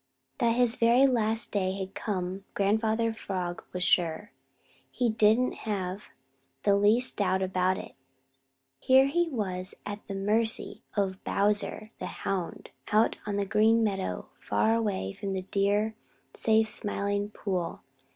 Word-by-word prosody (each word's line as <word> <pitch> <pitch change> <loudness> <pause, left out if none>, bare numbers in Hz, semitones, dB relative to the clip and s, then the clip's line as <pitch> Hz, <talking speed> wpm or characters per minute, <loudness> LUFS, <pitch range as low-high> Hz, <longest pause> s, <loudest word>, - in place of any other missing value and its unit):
That 230 -1 +3
his 245 -1 +3
very 235 +3 +5
last 225 -3 +2
day 190 -2 0
had 190 0 -5
come 190 -2 -3
Grandfather 220 +3 +1
Frog 185 -5 -4
was 180 0 -2
sure. 175 +4 +2 0.6
He 245 -2 0
didn't 220 +3 +3 0.2
have 195 -1 -3 0.6
the 200 - +4
least 215 +5 +3
doubt 190 -2 +1
about 185 0 +1
it. - - -8 0.9
Here 265 - +5
he 340 +5 +1
was 185 - -3
at 205 0 -5
the 200 - -4
mercy 215 +3 -1 0.2
of 190 -2 -1
Bowser 205 +1 0
the - - -4 0.2
Hound 195 -4 -3 0.2
out 215 +2 +3
on 205 - -1
the 200 0 0
Green 220 +3 +3
Meadows 195 -3 -2
far 225 +1 +1 0.4
from 200 0 -4
the 185 -1 -3
dear, 205 +2 +1 0.4
safe 220 0 +3
Smiling 205 -1 -2
Pool. 185 -5 -3
205 Hz, 135 wpm, -28 LUFS, 190-225 Hz, 0.9 s, very